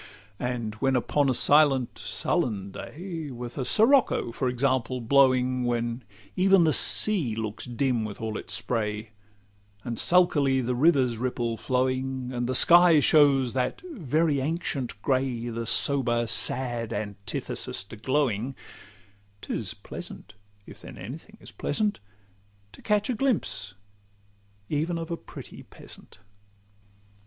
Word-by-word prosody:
And 120 -3 -3
when 135 -1 +2
upon 140 +3 +1
a - - +2
silent, 140 -4 +3
sullen 100 -4 -2
day, 165 - -7
With 120 -1 -8
a 135 - -3
sirocco, 225 - +3
for 130 +2 -2
example, 130 0 -1
blowing, 130 0 +2
When 120 0 -2 0.3
even 190 -1 +4
the 155 -2 +2
sea 165 - +4
looks 110 -1 -5
dim 125 -1 -1
with 105 -2 -7
all 110 -1 -4
its - - -7
spray, 110 -2 -3 0.7
And 115 -2 -5
sulkily 145 -7 +3
the 125 0 -1
river's 130 -3 +2
ripple 120 -2 -2
's - - -16
flowing, 130 0 -2
And 120 0 -3
the 130 - +1
sky 170 +1 +7
shows 140 -4 +4
that 125 - -2
very 155 - 0
ancient 140 - -3
gray, 130 -3 -1
The 115 0 -5
sober, 120 -3 +2
sad 115 +1 +1
antithesis 100 -2 -4
to 100 - -12
glowing,— 130 0 -1 0.9
'Tis - - -4
pleasant, 110 - -8 0.3
if - - -14
then - - -11
any - - -8
thing - - -19
is - - -13
pleasant, 210 +7 -2 0.7
To - - -15
catch 210 -1 0
a - - -1
glimpse 220 - -2 0.9
even 160 +3 -2
of 165 0 -6
a - - -1
pretty - - -12
peasant. - - -14
130 Hz, 135 wpm, -26 LUFS, 120-150 Hz, 0.9 s, sky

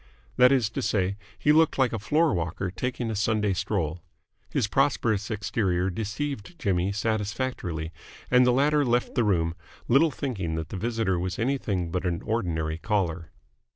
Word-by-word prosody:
That 125 +1 +6
is 120 -6 +2
to - - -3
say, 100 -2 0 0.2
he 150 - +3
looked 160 +1 +4
like 130 -3 +2
a 115 - -1
floorwalker 95 - 0
taking 125 +2 -2
a - - -3
Sunday 105 -1 +1
stroll. 90 -3 -2 0.5
His - - +1
prosperous 110 -5 +1
exterior 95 -4 0
deceived 115 - -4
Jimmy 95 - 0
satisfactorily, 105 -5 -2 0.4
and 125 0 +6
the 125 - +4
latter 145 +3 +3
left 120 -1 +1
the 120 - +2
room 85 -6 +1 0.3
little 140 +7 +5
thinking 100 - -3
that 80 -1 -4
the - - -6
visitor 110 -4 0
was 90 +4 -3
anything 115 -9 -1
but 90 +1 -1
an 85 -2 -2
ordinary 80 -8 -1
caller. 90 -5 -1
105 Hz, 155 wpm, -26 LUFS, 90-125 Hz, 0.5 s, That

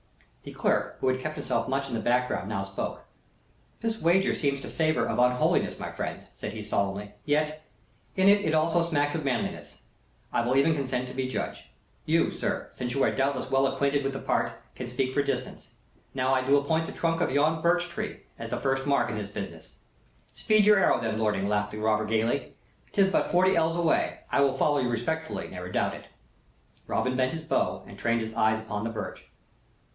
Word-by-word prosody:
The - - -10
clerk, - - 0
who 130 - +2
had 130 0 +1
kept 155 +3 -4
himself - - -1
much 135 +1 -1
in 130 - -7
the 115 - 0
background, 120 -5 0
now 100 -3 -1
spoke. 100 0 -5 0.8
"This 225 0 -2
wager 175 +4 +3
seems 140 -2 0
to - - -7
savor 155 -1 +1
of - - -1
unholiness, 125 0 +3
friends," - - -5
said 105 - -6
he, 110 -1 -6
solemnly. 100 0 -2
"Yet, 155 +1 0 0.5
in 190 - +3
that 200 +1 +6
it 160 0 +1
also 165 +2 +3
smacks 145 -3 +1
of 160 - -2
manliness, 130 -4 -2 0.6
I - - +3
will 125 +2 +1
even 150 +4 +4
consent 130 -3 -2
to - - -8
be 130 -1 -1
judge. 130 - -4 0.4
You, - - +3
sir, - - -3
since 125 0 -4
you 140 - +2
are - - +3
doubtless 135 -1 -1
well 135 0 +4
acquainted 140 +1 +1
with 135 0 -1
the 135 - -4
part, - - 0 0.2
can 125 - -6
speak 130 +1 -1
for 145 - +3
distance. 130 -2 -3 0.5
Now, 130 0 +2
I 130 - +3
do 140 +2 +4
appoint 160 +3 +1
the - - -5
trunk 165 0 0
of - - +2
yon 155 +3 +2
birch 175 +1 +3
tree 170 - -5 0.2
as 115 0 -6
first 135 +2 0
mark 140 -3 +2
in 110 - -3
this 100 -1 -5
business." 85 -6 -7 0.6
"Speed 215 -1 +3
your 210 0 +7
arrow, - - +4
then, 110 -1 -2
lording," 105 -3 +1
laughed 105 0 0
the - - -5
robber, 110 0 +1
gaily. 115 +4 0 0.4
"'Tis 195 -1 +4
but - - +1
forty 185 +2 +4
ells 165 0 +2
away! 170 -2 +1
I 140 - +3
will 135 -1 +2
follow 145 +1 +3
you 125 -2 0
respectfully, 160 +7 -2
never 90 -1 -7
doubt - - 0
it." - - -9 0.8
Robin 130 0 0
bent 130 +2 +1
his 160 -1 -5
bow 160 - 0
and - - -12
trained 115 0 +1
his 110 0 -5
eyes 110 0 +3
upon 110 -1 -4
the 115 - -1
birch. 115 - -6
135 Hz, 205 wpm, -28 LUFS, 115-155 Hz, 0.8 s, your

